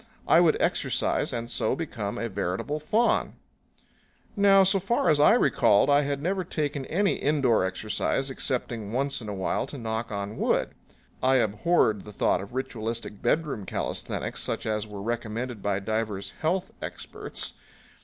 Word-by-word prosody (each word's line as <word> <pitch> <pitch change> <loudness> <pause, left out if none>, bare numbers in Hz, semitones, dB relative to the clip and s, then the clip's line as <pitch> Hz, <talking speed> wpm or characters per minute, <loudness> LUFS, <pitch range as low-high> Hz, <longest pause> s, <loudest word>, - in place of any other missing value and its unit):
I - - +6
would - - +4
exercise - - 0
and 115 -1 -3
so 125 - 0
become 115 -10 -4
a 115 - -2
veritable 100 +8 -2
faun. 215 +10 +1 1.0
Now, 200 -1 +6
so 195 +1 +3
far 195 -3 +2
as 150 - +3
I 150 - +7
recalled, 105 +8 +4
I 145 +1 +5
had 140 0 -2
never 185 +2 0
taken 145 -5 -3
any 195 +4 +1
indoor 135 -8 +2
exercise 110 +8 -1
excepting 120 -5 -2
once 135 +1 0
in 110 - -7
a - - -3
while 95 - -1
to 145 - -7
knock 110 -1 -3
on 100 +1 -4
wood. - - +1 0.5
I 130 +1 +4
abhorred 110 - +2
the 105 - -11
thought - - +1
of 100 +5 -9
ritualistic 115 -5 -4
bedroom 150 -10 0
calisthenics - - -3
such - - -3
as 110 -1 -1
were 100 -2 -7
recommended 115 0 -3
by 100 -1 0
divers 105 -1 -3
health 180 +4 0
experts. - - -5
120 Hz, 155 wpm, -27 LUFS, 105-150 Hz, 1.0 s, I